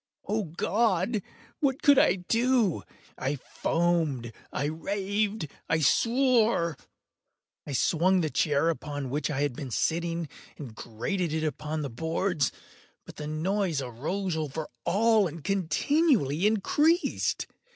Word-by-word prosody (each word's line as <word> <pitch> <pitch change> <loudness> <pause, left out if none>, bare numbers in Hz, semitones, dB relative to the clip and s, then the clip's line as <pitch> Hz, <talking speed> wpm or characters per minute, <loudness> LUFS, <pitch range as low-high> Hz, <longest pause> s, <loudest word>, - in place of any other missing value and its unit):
Oh 215 0 0
God! 195 +4 0 0.4
what 270 -2 0
could 285 -2 +7
I 180 - +4
do? 225 +1 +1 0.4
I 135 +2 -1
foamed—I 145 -5 -1
raved—I 195 0 -2
swore! 230 - +3 0.9
I 145 - -4
swung 180 +7 +3
the 155 -3 -1
chair 150 +1 +2
upon 145 -5 -4
which 150 +3 -1
I 140 -2 -1
had 145 -3 0
been 135 0 -6
sitting, 170 +5 -1 0.3
and 130 -7 -8
grated 150 - -3
it 160 0 -1
upon 155 0 -3
the 140 - -3
boards, 160 +2 0 0.5
but - - -12
the 150 - -5
noise 170 +1 0
arose 155 - -3
over 155 0 -4 0.2
all 215 +2 +3
and 160 -1 -9
continually 195 - +2
increased. 295 - +1
170 Hz, 120 wpm, -28 LUFS, 150-205 Hz, 0.9 s, could